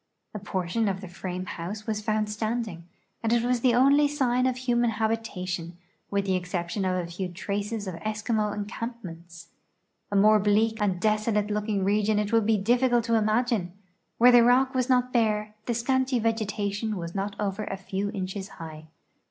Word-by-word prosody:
A 210 - -4
portion 195 +2 -1
of 190 -1 -1
the 190 - -8
frame 180 +1 -5
house 195 +5 -6
was 215 -2 -2
found 215 0 0
standing, 215 -4 -3 0.4
and 225 - 0
it 235 -1 +3
was 245 0 +1
the 240 0 +3
only 280 +4 +5
sign 255 -3 +1
of 255 -1 -1
human 240 -2 +1
habitation, 195 -6 -3 0.3
with 200 -1 0
the 190 - +1
exception 180 +1 -2
of 185 0 +1
a 180 -1 -1
few 185 +2 -3
traces 200 +4 -4
of 185 - -4
Eskimo 215 0 -1
encampments. 185 -6 -7 0.6
A - - -1
more 215 +2 +6
bleak 215 +2 +2
and 190 -4 +1
desolate 215 0 +1
looking 210 -1 -1
region 210 +2 +2
it 210 +1 -1
would 225 -2 +3
be 220 -1 +4
difficult 240 +3 +2
to 230 0 -1
imagine; 215 -4 +1 0.4
where 245 +2 +7
the 245 -1 +8
rock 255 +3 +4
"was 255 0 0
not 250 0 +2
bare, 215 -3 +1
the 240 - 0
scanty 260 +2 +1
vegetation 215 -1 -1
was 170 -1 -5
not 200 +1 -3
over 205 0 -2
a 195 - -4
few 195 +1 -3
inches 190 -1 -4
high. 155 -1 -9
210 Hz, 175 wpm, -27 LUFS, 195-230 Hz, 0.6 s, the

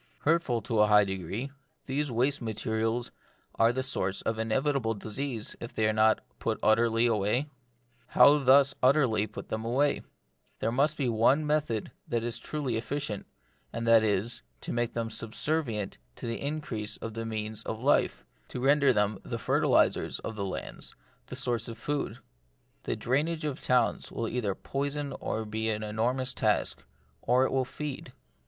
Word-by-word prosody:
Hurtful 145 -8 +1
to 115 -1 -1
a 105 - +6
high 105 0 +6
degree, 100 +7 -4 0.3
these 145 +2 -1
waste 130 +4 +1
materials 110 +1 -1 0.4
are 115 +1 +4
the 130 +2 -2
source 95 -8 -1
of 110 0 -1
inevitable 115 +1 0
disease 110 +3 -3
if 115 - -7
they 110 - +2
are 110 - +2
not 110 0 +4 0.2
put - - -1
utterly 115 +1 +4
away? 110 +2 +2
But 125 -3 -25
how 145 +1 +8
thus 135 +1 +6
utterly 125 -6 +3
put 110 - -9
them 110 0 -3
away? 135 +5 +1 0.6
There 115 - -1
is 145 +4 +2
but 135 -5 0
one 130 +7 +3
method 150 -8 0 0.2
that 115 -1 -1
is 120 -1 -2
truly 140 -7 -2
efficient, 125 -3 -3 0.4
and 115 0 -4
that 115 -1 +6
is, 105 +2 0 0.2
to - - -4
make 120 0 0
them 115 -1 -2
subservient 115 - -2 0.2
to - - -8
the 115 0 -3
increase 140 -8 -3
of 115 - -6
the 115 +1 -4
means 110 -1 -3
of 110 - -5
life, 140 +5 +2 0.2
to - - -6
render 140 +1 +4
them 105 -3 +1
the - - -5
fertilisers - - +2
of 115 - -5
our - - -1
lands, 95 - -6 0.3
the - - -7
source 120 -4 -1
of 115 -1 -7
food. 140 -2 -3 0.7
The - - -1
drainage 155 +5 0
of 145 -3 -3
towns 125 -2 +1
will 115 - -3
either 110 -6 -1
poison 140 +2 -3
or 110 0 -3
be 110 +1 -1
an 110 0 -1
enormous 125 +5 0
tax, - - +1 0.5
or 125 +2 +3
it - - -1
will 130 -1 +1
feed. 145 +2 -6
120 Hz, 170 wpm, -29 LUFS, 110-135 Hz, 0.7 s, how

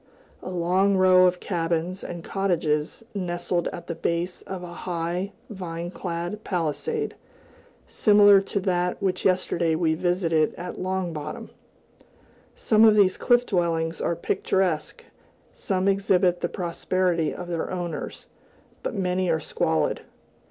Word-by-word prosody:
a - - -6
long 185 +3 +2
row 185 -1 +6
of 180 0 0
cabins 170 +1 -2
and 170 -1 -6
cottages 170 -3 -1
nestled 175 -2 -1
at 175 - -6
the 170 - -4
base 170 +2 -2
of 190 -2 -7
a 175 -1 -8
high, 175 +2 -3 0.2
vine 175 -3 -5
clad 175 +4 -4
palisade, 185 - -2 0.7
similar 205 -2 +6
to 200 +1 -2
that 180 -1 0
which 190 -2 -1
yesterday 170 -3 +2
we 160 -1 +1
visited 165 -2 +1
at 180 +1 -7
Long 185 -2 -2
Bottom. 150 0 -6 1.0
Some 215 0 +3
of 220 -1 +7
these 195 -3 +4
cliff 245 0 +3
dwellings 165 -4 0
are 170 - 0
picturesque, 170 -1 -1 0.5
some 190 0 -1
exhibit 190 -2 +2
the - - -1
prosperity 175 -1 0
of 180 - -7
their 170 -2 -3
owners, 175 -2 -5 0.6
but - - -4
many 185 -1 0
are 160 -1 +2
squalid. - - 0
180 Hz, 130 wpm, -25 LUFS, 170-190 Hz, 1.0 s, of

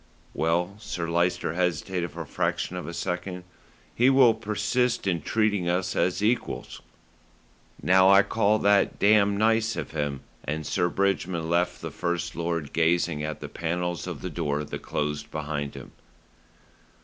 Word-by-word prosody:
"Well," 85 +4 0
Sir 90 -5 -4
Lyster 85 -1 0
hesitated 90 0 -1
for - - -6
the - - -17
fraction 90 - -1
of 90 - -5
a 85 - -5
second, 90 +1 -3 0.5
"he 125 +3 +4
will 130 -4 +6
persist 115 +3 0
in 85 -4 0
treating 105 -5 +1
us 90 +1 0
as 90 +3 +1
equals." 115 +3 -1 1.0
"Now 95 +1 +6
I 100 +1 +7
call 110 -1 +2
that 100 -1 +3
damned 100 -1 +4
nice 110 +1 +2
of - - -5
him;" 75 -3 -2 0.2
and 75 +1 -3
Sir 90 - +1
Bridgman 90 -4 -1
left 90 +1 +1
the - - -4
First 85 -1 -2
Lord 85 -3 -3
gazing 85 -1 +2
at 75 -1 -4
the - - -5
panels 85 +1 -3
of - - -6
the - - -4
door 75 +1 -1
that - - -6
closed 75 0 -3
behind 75 -2 -4
him. - - -10
90 Hz, 155 wpm, -26 LUFS, 80-100 Hz, 1.0 s, I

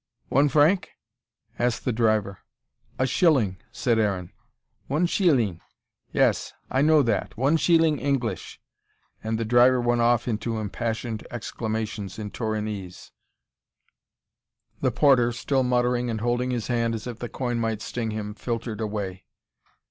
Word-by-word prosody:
One 140 +2 +4
franc?" 155 +7 +3 0.7
asked 120 -1 0
the 125 - +1
driver. 110 -4 +1 0.6
"A 130 - +2
shilling," 130 - +2
said 120 -4 +1
Aaron. 95 -4 -1 0.6
"One 150 +6 +1
sheeling. 130 - +2 0.5
Yes. - - +1 0.2
I 130 - +2
know 155 0 +5
that. 110 -5 -1
One 135 +6 +3
sheeling 165 -2 +3
English" 120 -10 -2 0.6
and 110 0 -1
the 115 - -2
driver 125 +3 +5
went 120 0 +1
off 120 0 +2
into 115 0 -2
impassioned 110 +1 -3
exclamations 110 -3 -4
in 105 -2 -6
Torinese. 105 -5 -4 1.7
The - - +2
porter, 125 -5 +4
still 130 +3 0
muttering 125 -1 +1
and 110 -1 -2
holding 120 +2 0
his 120 -3 -2
hand 115 -2 0
as 110 - -6
if 120 -2 -6
the 120 - -5
coin 120 -2 -2
might 110 -2 -2
sting 115 -2 -3
him, 105 -1 -4
filtered 115 0 -4
away. 100 -4 -4
120 Hz, 135 wpm, -25 LUFS, 110-125 Hz, 1.7 s, know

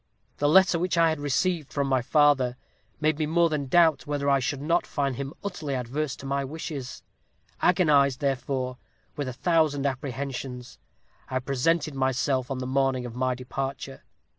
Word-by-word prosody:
The 145 - +2
letter 180 0 +5
which 180 0 0
I 165 -1 +5
had 160 -1 -2
received 150 +2 0
from 140 -1 0
my 130 -2 +1
father 135 -2 +3 0.4
made 155 0 +1
me 155 - 0
more 170 +1 +3
than 145 -3 -2
doubt 165 +1 +4
whether 145 -1 -2
I 140 - +4
should 135 +2 -2
not 165 +5 0
find 140 -3 -1
him 140 +2 -5
utterly 165 -8 -3
adverse 130 +4 -3
to - - -11
my 140 0 -1
wishes. 140 -2 -6 0.6
Agonized, 145 -7 +4
therefore, 130 -2 -2 0.4
with 145 -2 -3
a 130 - -4
thousand 155 -1 +1
apprehensions, 130 -2 -4 0.5
I 130 - -1
presented 140 +4 0
myself 130 -1 0
on 135 - -2
the 130 - -4
morning 130 -1 0
of 120 - -7
my 130 0 0
departure. 135 +1 -5
140 Hz, 165 wpm, -26 LUFS, 130-155 Hz, 0.6 s, letter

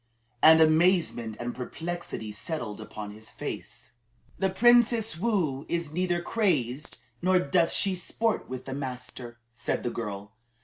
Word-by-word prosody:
And 160 +1 +8
amazement 160 - +3
and 120 0 -3
perplexity 165 -4 -5
settled 110 -1 -4
upon 105 -1 -7
his 110 +1 -12
face. - - -7 0.5
"The 190 - +2
Princess 230 -2 +4
Woo 175 - 0
is 170 -3 -2
neither 175 0 0
crazed 150 - 0 0.2
nor 185 +1 +4
doth 170 0 +2
she 195 -1 +2
sport 215 +5 -1
with 130 0 -6
the 135 - -5
master," 125 -3 -6 0.2
said 120 - -2
the 120 - -1
girl. 105 -2 -6
155 Hz, 135 wpm, -28 LUFS, 120-185 Hz, 0.5 s, And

